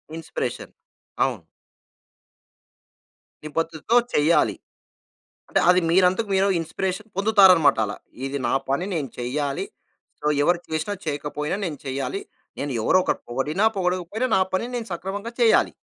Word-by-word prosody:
Inspiration. 165 - -5 0.5
అవును. - - -4 2.0
నిబద్దతతో 165 +8 0 0.2
చెయ్యాలి. 150 +1 +3 0.9
అంటే - - +2
అది 180 0 +5
మీరంతకు 185 +4 +3
మీరు 190 +1 +3
ఇన్‌స్పిరేషన్ 190 +6 -3
పొందుతారన్నమాట 195 - +6
అలా. 100 - -5 0.3
ఇది 140 +1 -3
నా - - 0 0.2
పని 140 +7 0
నేను 145 -5 -2
చెయ్యాలి. 140 +3 -2 0.6
సో, 150 - -5 0.2
ఎవరు 175 +3 +3
చేసినా, 160 +5 -2
చేయకపోయినా 150 +2 -2
నేను 150 -4 -5
చెయ్యాలి. 135 +7 -3 0.4
నేను 140 -1 -3
ఎవరో 185 - +4
ఒకరు - - -1
పొగడినా 150 - -1
పొగడకపోయినా, 185 +6 -1
నా - - +3
పనిని 240 +6 -1
నేను 230 -2 -4
సక్రమంగా 200 +6 -5
చెయ్యాలి. 230 -2 +4
170 Hz, 120 wpm, -24 LUFS, 145-195 Hz, 2.0 s, పొందుతారన్నమాట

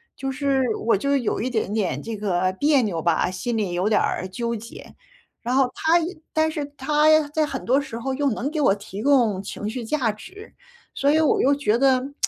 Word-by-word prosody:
就 270 0 -4
是 275 -1 0 0.3
我 230 - +4
就 280 +7 0
有 240 -5 -1
一 250 - -1
点 220 -4 -2
点 175 -11 -1
这 225 -2 -6
个 185 -2 0
别 285 -2 +4
扭 175 -7 -2
吧， 170 +2 +1
心 225 +5 -3
里 200 -5 -1
有 180 +4 0
点 210 - +3
儿 185 - -2
纠 235 +3 -3
结， 230 +1 -10 0.5
然 245 +2 -2
后 265 -2 +3
他 320 +1 +1 0.4
但 315 0 +2
是 295 -2 -3
他 300 +2 +3
在 310 +1 +1
很 270 -3 -5
多 265 +4 +3
时 270 -5 -7
候 265 +3 -3
又 280 +1 0
能 255 +7 -3
给 310 - -3
我 200 -8 +4
提 200 0 -8
供 240 -9 +3
情 205 +1 -5
绪 240 +2 -5
价 245 -3 0
值， 375 - -13 0.4
所 280 - +1
以 315 - +3
我 310 - +2
又 280 +2 +3
觉 235 -5 +1
得 265 +1 +2
255 Hz, 230 characters per minute, -23 LUFS, 210-285 Hz, 0.5 s, 我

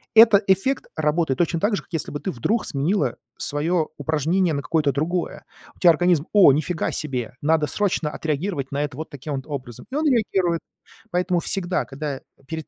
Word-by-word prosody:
Этот 220 -2 +8
эффект 195 +9 +2
работает 155 -2 0
точно 170 -1 +1
так 205 +3 +1
же, - - -3
как - - -29
если 165 - -2
бы 145 - -4
ты 190 - -2
вдруг 210 - -1
сменила 160 +9 0 0.2
своё 155 +2 0
упражнение 160 +4 +1
на 140 - -1
какое-то 150 0 +1
другое. 170 +6 -2 0.3
У - - -25
тебя 175 - +7
организм: 170 -1 +2
"О, 190 -9 +8
нифига 160 +3 -1
себе. 125 -5 -4
Надо 155 0 +2
срочно 175 -3 0
отреагировать 155 -2 -3
на 140 - -1
это 140 -3 -4
вот 160 - -6
таким 145 0 -5
вот 135 - -6
образом". 130 - -7
И 275 - -4
он 310 0 +1
реагирует. 190 - +1 0.5
Поэтому 180 0 +1
всегда, 180 0 -1
когда 140 0 -5 0.3
перед 160 -1 -5
160 Hz, 185 wpm, -23 LUFS, 145-185 Hz, 0.5 s, Этот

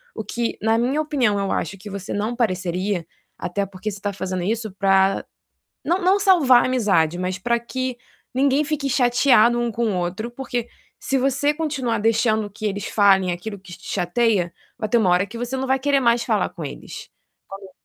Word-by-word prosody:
o - - -4
que 235 -1 -2
na 225 +1 +2
minha 260 +6 +1
opinião 265 -9 +1
eu 195 -1 -1
acho 195 - -2
que 205 +2 -10
você 195 -1 -6
não 215 +4 -2
pareceria, 185 -4 -1 0.3
até 200 +3 -2
porque 195 +2 -6
você 200 - -8
tá 205 0 -3
fazendo 185 -2 -3
isso 220 +2 -2
pra 195 0 +2 0.6
não 350 - +1
não 375 +3 +4
salvar 335 -11 +5
a - - +1
amizade, 195 -10 +2
mas 185 +1 -2
pra 235 +4 +1
que 255 +1 -4 0.4
ninguém 275 +3 +2
fique 295 -2 -2
chateado 245 -2 +4
um 240 0 0
com 230 -1 0
o - - -2
outro, 185 +7 -3
porque 240 -1 -4 0.3
se 270 - -1
você 275 +3 +1
continuar 285 -7 -2
deixando 220 0 +1
que 210 +2 -10
eles 200 0 -3
falem 195 -3 +4
aquilo 200 +4 -6
que 185 -2 -12
te 185 - -13
chateia, 185 -1 +1 0.3
vai 215 - -2
ter 235 - +2
uma 200 -5 +3
hora 180 +2 +3
que 210 - -10
você 245 +2 -4
não 265 0 -2
vai 265 +1 +2
querer 280 +1 +2
mais 235 -1 +3
falar - - +1
com - - -8
eles". - - -8 0.4
Quando 195 0 -10
220 Hz, 200 wpm, -22 LUFS, 195-255 Hz, 0.6 s, salvar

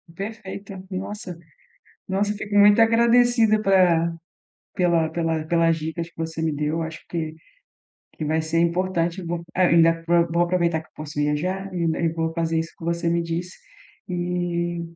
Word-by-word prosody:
Perfeito, 200 0 -7 0.2
nossa 190 -1 -6 0.7
nossa, 200 +2 0
fico 205 0 -5
muito 205 +2 +7
agradecida 230 -1 +4
pela 175 -4 +3 0.6
pela 170 -4 +2
pela 160 -1 -1
pelas 165 -1 +3
dicas 160 +1 -4
que - - -32
você 160 0 -4
me 160 -1 +1
deu, 150 +2 -1
acho 160 0 -5
que 160 -2 -4 0.8
que 155 - -6
vai 155 +2 +1
ser 160 +1 0
importante, 175 +1 0
vou 170 0 -3
ainda 165 -2 +4
pro 170 0 +3
vou 170 +1 +2
aproveitar 170 -2 +1
que 160 - -17
eu - - -46
posso 150 -1 -7
viajar 180 +7 -1
e 175 - -2
ainda 165 -1 0
e 170 - +2
vou 160 0 -2
fazer 165 -1 0
isso 165 0 -3
que - - -11
você 170 0 -1
me 170 0 +1
disse 170 +2 -4 0.5
e 175 -1 -2
170 Hz, 165 wpm, -23 LUFS, 165-185 Hz, 0.8 s, muito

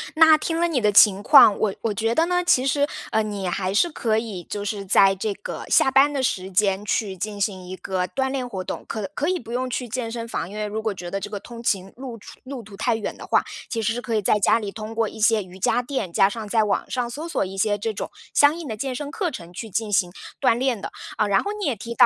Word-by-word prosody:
那 320 0 +7
听 325 +2 -2
了 345 - +3
你 300 -6 +1
的 210 -3 +3
情 200 -1 +7
况， 205 0 +7
我 205 -3 0
我 225 - -1
觉 225 +3 0
得 325 - +4
呢， 360 0 +2
其 265 -7 +3
实， 285 +1 +2 0.2
呃， 220 - +2
你 205 -2 -4
还 185 +1 -2
是 345 +12 +3
可 225 -8 0
以， 210 -6 -4
就 205 - -3
是 205 -1 -4
在 195 +1 +5
这 200 +2 -2
个 205 - -7
下 265 - +4
班 275 +2 +5
的 275 -2 -1
时 190 -6 -1
间 195 +1 +1
去 200 -2 -1
进 205 +2 -4
行 190 -3 -2
一 185 - -6
个 185 0 -2
锻 265 +3 -1
炼 260 -2 -2
活 190 -6 -5
动。 - - -6
可 210 -4 -4
可 295 - -1
以 370 +1 +1
不 230 -2 -11
用 255 +1 -1
去 250 -1 -3
健 240 0 -3
身 230 0 -5
房， 225 -6 -4
因 205 - -10
为 215 0 -2
如 210 +1 -3
果 220 -1 -1
觉 175 -2 -8
得 195 - -2
这 200 +1 -6
个 205 - -4
通 235 -1 -10
勤 195 -4 -1
路 255 -3 -7
除 205 - -14
路 260 -2 -7
途 200 -1 -13
太 225 - +1
远 220 - -4
的 - - -10
话， - - +3 0.3
其 230 - -2
实 220 - +1
是 245 - -4
可 230 -2 -2
以 215 - +2
在 210 +1 +3
家 205 - +4
里 210 -3 -4
通 215 +1 -7
过 225 -1 +1
一 - - -11
些 220 -1 +3
瑜 185 0 -13
伽 245 - +2
垫， 245 -9 -4
加 195 - +5
上 220 0 -6
在 220 +1 +2
网 205 -2 -1
上 245 -2 -2
搜 300 +7 -6
索 335 - 0
一 190 +1 -8
些 205 +1 +1
这 220 +2 -3
种 - - -5 0.2
相 290 +2 +5
应 330 -5 -7
的 220 - -4
健 260 +3 -3
身 290 +2 -5
课 365 0 -1
程 175 - -9
去 220 +5 -7
进 215 +2 -2
行 180 -3 +2 0.3
锻 255 -4 +3
炼 255 -3 0
的。 - - -6 0.3
啊， 210 - +2
然 200 -1 +2
后 405 - -2
你 405 - -2
也 270 - 0
提 230 +3 -7
到， - - +7
220 Hz, 305 characters per minute, -23 LUFS, 200-255 Hz, 0.3 s, 那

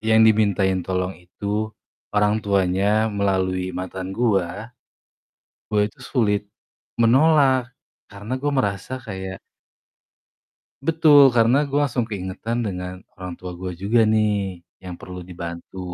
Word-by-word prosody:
yang 110 0 +4
dimintain 100 -4 +3
tolong 90 0 -1
itu 100 +4 -3 0.5
orang 105 +1 +3
tuanya 100 +2 +1
melalui 95 -2 0
mantan 95 +1 -5
gua, 105 -1 0 1.0
gua 105 -1 +1
itu 135 - -20
sulit 105 -6 0 0.6
menolak. 130 0 +4 0.3
Karena 105 +6 -5
gua 145 +2 -1
merasa 125 +1 -2
kayak 95 -5 -7 1.4
Betul, 150 -4 +6
karena 120 +4 +4
gua 145 0 +1
langsung 120 -1 -1
keingetan 110 +2 -4
dengan 90 -1 -5 0.2
orang 90 -1 -7
tua 90 -1 -7
gue 90 +1 -5
juga 115 +3 +3
nih, 105 -4 +1 0.2
yang 90 -2 -8
perlu 90 -1 -8
dibantu. 85 +1 -8
105 Hz, 115 wpm, -22 LUFS, 95-120 Hz, 1.4 s, Betul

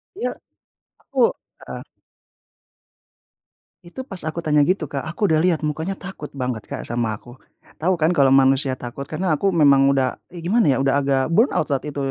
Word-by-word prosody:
Iya. 425 - -2 0.7
Aku, - - -4 0.4
heeh. - - -8 2.0
Itu 180 +10 -8
pas 195 -8 -7
aku 165 +2 -4
tanya 150 -2 +2
gitu, 170 -5 -1
Kak, 140 +2 -4
aku 170 +7 -5
udah 155 - +4
lihat 165 -2 +1
mukanya 160 +5 -2
takut 190 -6 -8
banget, 125 -4 -4
Kak, - - -6
sama 115 -2 -2
aku, 120 +4 -15 0.4
tahu 180 +4 +2
kan 160 0 +2
kalau 140 -6 +4
manusia 135 0 +3
takut? 130 +2 -7
Karena 175 +4 -2
aku 185 +5 +1
memang 140 -4 +5
udah 135 -2 +1
e 170 -2 -10
gimana 210 +3 +2
ya, 135 -3 +3
udah 135 +1 +2
agak 135 -1 +1
burnout 220 - +3
saat 140 +1 -1
itu 150 - -7
150 Hz, 175 wpm, -21 LUFS, 135-175 Hz, 2.0 s, memang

